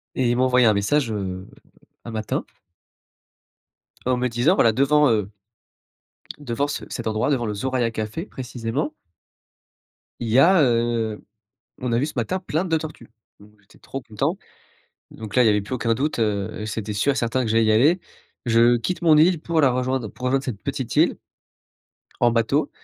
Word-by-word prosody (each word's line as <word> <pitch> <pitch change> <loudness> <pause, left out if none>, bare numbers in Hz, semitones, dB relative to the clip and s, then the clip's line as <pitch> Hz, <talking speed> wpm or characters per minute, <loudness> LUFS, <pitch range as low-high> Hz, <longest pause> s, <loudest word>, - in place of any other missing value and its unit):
Et 125 -2 +1
ils 120 - +1
m'ont 130 - +3
envoyé 125 -2 +4
un 110 - +5
message, 115 +5 +1
heu, 95 -3 -4 0.6
un 120 - -7
matin 110 -2 -3 1.6
en 130 -1 +2
me 125 0 0
disant 120 +10 +2
voilà, 115 -10 +4
devant, 145 +3 +3
heu 105 -2 0 1.1
devant 140 +1 -2
ce - - -4
cet 120 - -6
endroit 110 +6 0
devant 120 -4 0
le 105 - -3
Soraya 125 +1 -1
café 110 - -5
précisément 125 +4 -4 1.3
il 115 - -3
y 120 +4 +3
a, 170 +3 +6
heu, 115 -3 0 0.6
on 125 -2 -2
a 115 - +2
vu 140 - 0
ce - - -6
matin 125 +10 -1
plein 180 -1 -2
de 165 -3 +1
tortues 155 -7 -7 0.3
donc 105 +1 -17
j'étais 100 +2 -23
trop 135 - -7
content 135 - -2 0.8
donc 110 -2 -8
là 125 - +6
il - - +3
y - - +5
avait 105 -1 +2
plus 115 +6 -4
aucun 115 -2 0
doute, 140 +3 -2
heu, 105 -1 -2
c'était 105 0 -4
sûr 140 +8 +1
et - - -9
certain 125 +1 0
que 110 - -1
j'allais 115 0 +3
y 110 - +3
aller. 150 +11 +4 0.5
Je 120 +1 +4
quitte 175 +11 -3
mon 160 -3 +5
île 165 +1 +4
pour 165 -1 -1
la 140 - +5
rejoindre, 130 -2 -1
pour 125 - -8
rejoindre 135 +1 +1
cette 105 -6 -5
petite - - -4
île - - +3 1.0
en 120 - +4
bateau, 115 +6 +1
120 Hz, 185 wpm, -23 LUFS, 110-140 Hz, 1.6 s, a